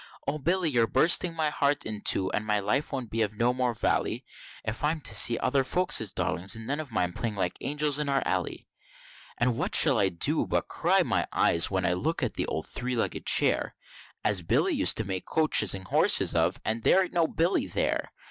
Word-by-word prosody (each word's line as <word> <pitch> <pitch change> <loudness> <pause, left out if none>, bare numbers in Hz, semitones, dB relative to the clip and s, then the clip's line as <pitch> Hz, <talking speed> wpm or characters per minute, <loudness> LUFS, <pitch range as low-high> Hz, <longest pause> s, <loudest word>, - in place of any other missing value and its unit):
O 150 +2 -2
Billy, 170 +2 0
you're 115 -3 +2
bursting 170 +5 +2
my 155 -2 -1
heart 145 0 -1
in 105 -1 -6
two, 95 -1 +1
and 105 - -2
my 105 -1 0
life 115 +9 -2
won't 130 -5 -5
be 115 - -2
of 105 -1 -2
no 120 +3 +1
more 125 -2 -2
vally, - - -2 0.4
If 110 +4 -5
I'm 155 +2 0
to 120 -4 0
see 115 +2 +5
other 135 -1 0
folk's 180 +7 +2
darlins, 95 +4 -1
and 115 0 -8
none 140 +5 -3
of 150 -5 -7
mine, 90 -5 -2
playing 110 +1 -4
like 90 -3 -2
angels 145 +1 0
in 150 -1 -2
our 135 -1 0
alley, - - -3 0.7
And 120 -1 0
what - - -1
shall - - +5
I 95 - +2
do 85 -2 -1
but - - -2
cry - - +1
out - - -1
my - - -1
eyes, 85 - +3
when 95 -2 -2
I 90 - +1
looks 155 - -2
at - - -5
the - - -3
old - - -4
three 125 0 -4
legged 115 - -3
chair, - - +3 0.5
As 100 -3 +3
Billy 80 - 0
used - - +2
to 110 - -2
make 95 -2 -5
coaches 155 - +3
and 95 -1 -9
horses - - +4
of, - - 0
and 110 +1 -1
there 190 +11 +3
ain't 180 - -8
no 170 -2 +1
Billy 170 +4 -1
there! - - -2
120 Hz, 225 wpm, -27 LUFS, 105-150 Hz, 0.7 s, see